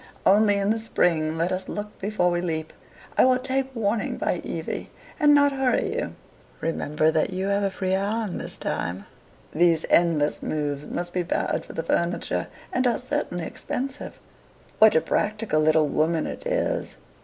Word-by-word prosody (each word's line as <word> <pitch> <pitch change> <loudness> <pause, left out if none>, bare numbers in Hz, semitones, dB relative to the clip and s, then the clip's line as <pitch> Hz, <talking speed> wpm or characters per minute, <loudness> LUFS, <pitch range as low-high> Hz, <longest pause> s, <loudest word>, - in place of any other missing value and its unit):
Only, 205 +1 +5
in 200 +1 +1
the 225 - 0
spring, 165 -7 +1
let 170 +3 0
us 185 0 -3
look 210 0 -6
before 195 -3 +1
we 175 0 0
leap. 160 -3 -3 0.5
I - - +8
will 255 0 +5
take 265 +1 -1
warning 220 0 -1
by - - 0
Evie, - - -4 0.3
and 295 -1 +6
not 285 0 +5
hurry 265 -2 +1
you. - - -3 0.4
Remember 155 -1 0
that 160 -1 +1
you 190 +1 -2
have 200 0 +1
a 200 - +1
free 190 -1 -3
hand 200 +1 -1
this - - -1
time. 90 +3 -3 0.5
These 165 -1 +3
endless 160 -4 +3
moves 145 -1 -3
must 175 0 -4
be 180 - +1
bad 175 - -1
for - - -9
the 165 - -3
furniture, 170 +1 -1 0.3
and 255 -6 +2
are 240 - +2
certainly 250 - -3
expensive." 270 - -5 0.6
"What 220 0 +7
a 160 - +5
practical 210 -6 0
little 155 0 +4
woman 155 +2 +1
it - - -6
is! - - -1
190 Hz, 170 wpm, -25 LUFS, 160-225 Hz, 0.6 s, I